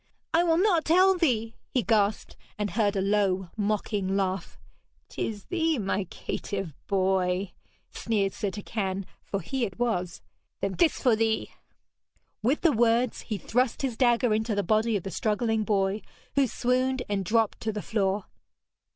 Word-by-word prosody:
'I 335 +2 +5
will 330 -1 +3
not 360 -4 +3
tell 370 +4 +5
thee!' 235 -10 +1 0.2
he 250 - 0
gasped, 215 -2 +1 0.2
and 210 -1 -2
heard 205 -2 +1
a 195 - +1
low 195 -2 +1
mocking 205 -2 -1
laugh. 190 -2 -2 0.5
''Tis 210 -3 -4
thee, 325 -3 +1
my 195 -2 -1
caitiff 195 -1 -5
boy!' 190 -1 +1 0.4
sneered 200 -4 -1
Sir 205 - -2
Turquine, 195 -1 -3 0.2
for 200 - -3
he 260 +9 -2
it 195 -5 -3
was. 185 -8 -1 0.4
'Then 195 -1 -1
this 335 -3 +3
for 245 -4 +4
thee!' 220 0 0 0.9
With 255 +8 +1
the 335 - +5
words 235 0 +2
he 215 - -1
thrust 250 - 0
his 255 -4 -1
dagger 240 -2 +3
into 220 0 0
the 205 - +1
body 215 +4 +2
of 185 - -7
the 195 - -5
struggling 220 +3 0
boy, 200 0 +1 0.3
who 275 -2 +3
swooned 255 +2 0
and 200 -1 -1
dropped 225 +2 +1
to 220 - -2
the 210 -1 -5
floor. 200 -2 0
215 Hz, 160 wpm, -27 LUFS, 195-245 Hz, 0.9 s, I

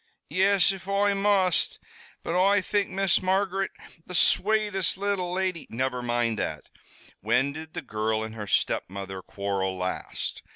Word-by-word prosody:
"Yis, 195 0 +4
if 190 -1 -8
Oi 200 +1 +2
must. 195 -3 +2 0.5
But - - -2
Oi 195 +3 +4
think 200 +1 0
Miss 195 -1 +2
Margaret 190 +1 +1 0.3
the 180 - -7
swatest 205 -2 +2
little 195 -3 -1
lady 185 -2 -1
" - - -44
"Never 125 +1 -1
mind 120 -2 0
that. - - -4 0.5
When 125 +7 +1
did 160 +1 -9
the - - -4
girl 110 -2 -1
and 110 0 -6
her 105 -2 -6
stepmother 95 0 -1
quarrel 95 -1 -2
last? 90 0 -3
180 Hz, 150 wpm, -27 LUFS, -, 0.5 s, Yis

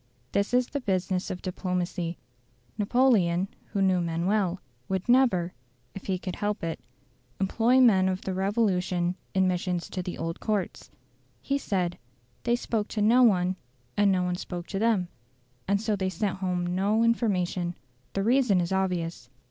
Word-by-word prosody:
This 200 +1 0
is 250 0 +3
the 285 - -3
business 185 -3 -1
of 180 - -5
diplomacy. 180 -2 -2 0.6
Napoleon, 200 -6 +3 0.2
who 195 - -1
knew 185 -2 +3
men 170 0 -1
well, 195 -2 +1 0.3
would 190 -1 -2
never, 240 -9 +3 0.4
if 195 - -9
he 190 -2 0
could 185 0 -6
help 205 -1 -2
it, 165 -1 -3 0.6
employ 230 +6 +3
men 195 -7 +5
of 185 0 -2
the 190 - -3
Revolution 185 -3 +1 0.2
in 190 -1 +4
missions 180 -1 -1
to 185 - -2
the 180 0 -5
old 165 0 -4
courts; 210 -3 -2 0.5
he 280 +1 -1
said, 180 -8 -1 0.5
"They 240 - +3
spoke 225 -3 -2
to 215 - -3
no 235 +4 +5
one 185 -5 +4 0.4
and 205 -1 +4
no 185 -1 +2
one 180 0 -1
spoke 175 -1 -6
to 195 - -2
them"; 215 -5 +2 0.6
and 200 +1 +2
so 215 0 0
they 190 -1 -1
sent 190 +1 -2
home 180 -2 -1
no 205 +4 +2
information. 185 -6 +1 0.4
The 195 - 0
reason 240 -4 +3
is 170 0 -1
obvious. 175 -8 -1
190 Hz, 165 wpm, -27 LUFS, 180-215 Hz, 0.6 s, men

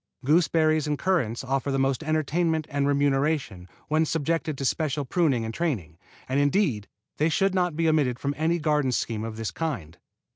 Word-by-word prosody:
Gooseberries 155 0 +3
and 150 -1 0
currants 140 - 0
offer 135 +1 -1
the 135 - 0
most 135 +1 +1
entertainment 155 +1 0
and 140 0 0
remuneration 140 - 0 0.2
when 155 +1 +2
subjected 160 -1 -1
to 135 - -3
special 145 0 0
pruning 135 -5 +1
and 110 - -5
training, 105 - -3 0.3
and 130 +2 0
indeed 145 - +1 0.3
they 155 +2 +2
should 195 +3 +1
not 180 -4 +1
be 165 +1 +1
omitted 145 -6 +2
from 140 +2 -2
any 165 +3 +1
garden 150 -4 +1
scheme 115 -3 -2
of 110 -1 -6
this 115 -1 -3
kind. 105 - -4
145 Hz, 175 wpm, -26 LUFS, 130-160 Hz, 0.3 s, Gooseberries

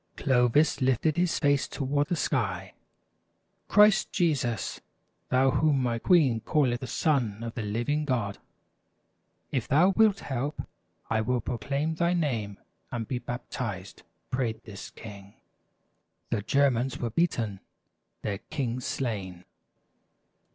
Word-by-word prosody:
Clovis 130 +3 +3
lifted 130 +4 +2
his 175 -1 +1
face 145 -2 +2
toward 145 +1 -1
the 175 - 0
sky. 95 - -1 0.5
" - - -47
Christ 210 -1 +5
Jesus, 140 - 0 0.5
thou 130 +1 +4
whom 145 -3 +2
my 120 -2 0
queen 140 -8 +4
calleth 125 -1 +1
the 130 - -6
Son 120 -10 0
of 115 -1 -5
the 115 - -4
Living 120 +9 -1
God, 115 -8 -1 1.1
if 120 -3 -1
thou 160 +7 +5
wilt 205 0 +3
help, 140 +3 -3 0.5
I 110 -1 +2
will 125 +3 0
proclaim 140 +7 -2
thy 170 +2 +1
name, 115 - -1 0.3
and 115 -2 -3
be 125 - -2
baptized! 120 -6 -5 0.2
" - - -47
prayed 125 -4 -1
this 100 -3 -9
king. 100 -2 -11 1.0
The - - 0
Germans 130 +1 +2
were 120 -2 -3
beaten, 115 - 0 0.6
their 100 -2 -2
king 130 -5 -3
slain. 100 -9 -4
125 Hz, 130 wpm, -28 LUFS, 115-145 Hz, 1.1 s, Christ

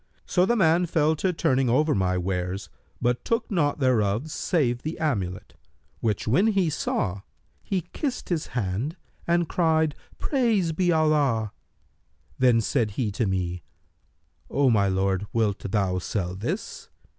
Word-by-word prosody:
So 180 0 +2
the 240 - +3
man 175 -3 +3
fell 160 -1 +2
to 185 +5 +1
turning 130 -6 +1
over 150 +5 +3
my 90 -1 +1
wares, 90 +1 -3 0.3
but 120 0 0
took 230 0 -1
nought 150 -7 +1
thereof 125 0 +1
save 125 -10 0
the 155 +2 -4
amulet, 100 - -2 0.5
which 110 -3 -1
when 180 - +3
he 195 -7 +2
saw, 100 -9 -2 0.4
he 190 -2 -1
kissed 275 -5 -3
his 170 -4 -1
hand 110 - -2 0.3
and 170 -1 +2
cried, 160 -3 +2 0.2
'Praised 220 - +1
be 175 +1 +2
Allah!' 145 -9 +2 0.9
Then 125 -3 +4
said 115 -1 0
he 115 -6 0
to 110 +2 -1
me, 90 -2 -2 0.9
'O 135 -2 +3
my 100 -3 +3
lord, 95 +1 0
wilt 110 -4 +1
thou 95 -2 0
sell 90 -1 -3
this?' 215 - -5
130 Hz, 145 wpm, -25 LUFS, 100-165 Hz, 0.9 s, Then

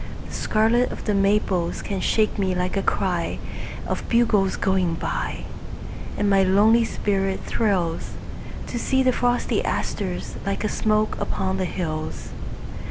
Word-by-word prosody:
The - - -9
scarlet 225 +3 +2
of - - -6
the 210 - +1
maples 195 -3 +1
can 195 -2 -2
shake 215 -1 +2
me 190 -2 +1
like 180 +1 -1
a 195 - +2
cryOf - - 0 0.7
bugles 215 -5 +3
going 185 -3 +1
by. - - -3 0.7
And 205 - +1
my 195 -1 +5
lonely 210 +5 +5
spirit 195 -3 -1
thrillsTo 185 -7 0 0.7
see 265 +2 +2
the 255 - +4
frosty 245 0 +1
asters 185 -4 -2
like 200 +1 -2
a 215 - +1
smoke 215 0 +1
upon 190 0 -1
the 190 - 0
hills. 155 -3 -3
200 Hz, 135 wpm, -24 LUFS, 185-215 Hz, 0.7 s, my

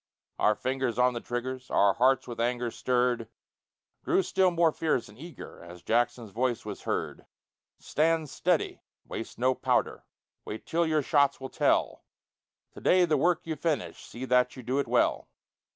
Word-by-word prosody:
Our 105 - +3
fingers 130 0 -2
on 125 0 +3
the 120 - -4
triggers, 130 +1 -5
Our 100 -1 +4
hearts, 130 +3 +2
with 120 -1 -7
anger 120 0 -1
stirred, 125 -2 0 0.8
Grew 190 - +2
still 190 0 +2
more 170 -2 +3
fierce 155 -6 -1
and 105 - -15
eager 165 +8 -11
As 85 0 -12
Jackson's 120 -1 0
voice 120 +1 -1
was 105 -2 -6
heard: - - -3 0.5
"Stand 160 0 0
steady! - - 0 0.3
Waste 115 - -6
no 130 +2 +2
powder! - - 0 0.4
Wait 110 - -7
till 170 0 +1
your 155 -2 +1
shots 140 -1 +2
will 130 0 -6
tell! - - +1 0.7
To - - -12
day 180 0 +4
the 160 -3 +1
work 165 +4 +1
you 160 -1 -3
finish 160 -2 -2
See 125 +2 -7
that 125 -1 +2
you 130 - -9
do 130 +4 -1
it 140 - -1
well!" - - +1
130 Hz, 170 wpm, -28 LUFS, 120-155 Hz, 0.8 s, Our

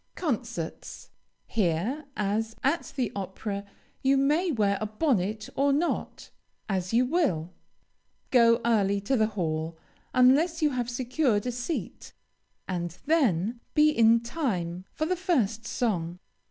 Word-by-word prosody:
CONCERTS 235 - -4 0.3
Here, 215 - -1
as 215 +2 -1
at 290 +6 0
the 250 -6 -1
opera, 200 +1 -4 0.4
you 270 +1 +3
may 305 +6 +2
wear 205 -6 +1
a 215 - -1
bonnet 215 - 0
or 280 +1 +3
not, 310 +5 -2 0.4
as 185 -3 -2
you 240 +2 +4
will. 250 - 0 0.8
Go 235 -2 +5
early 200 -4 +2
to 225 +7 0
the 220 -3 +3
hall, 160 -1 -2 0.3
unless 285 +7 +4
you 305 -3 +2
have 245 -2 -2
secured 245 -2 0
a 250 - -1
seat, 245 +7 -5 0.5
and 175 -2 -3
then, 235 - +2 0.2
be 305 0 +6
in 230 -3 +5
time 190 - -3
for 310 - -2
the 365 +3 0
first 235 - 0
song. 180 -9 -1
230 Hz, 130 wpm, -27 LUFS, 200-275 Hz, 0.8 s, be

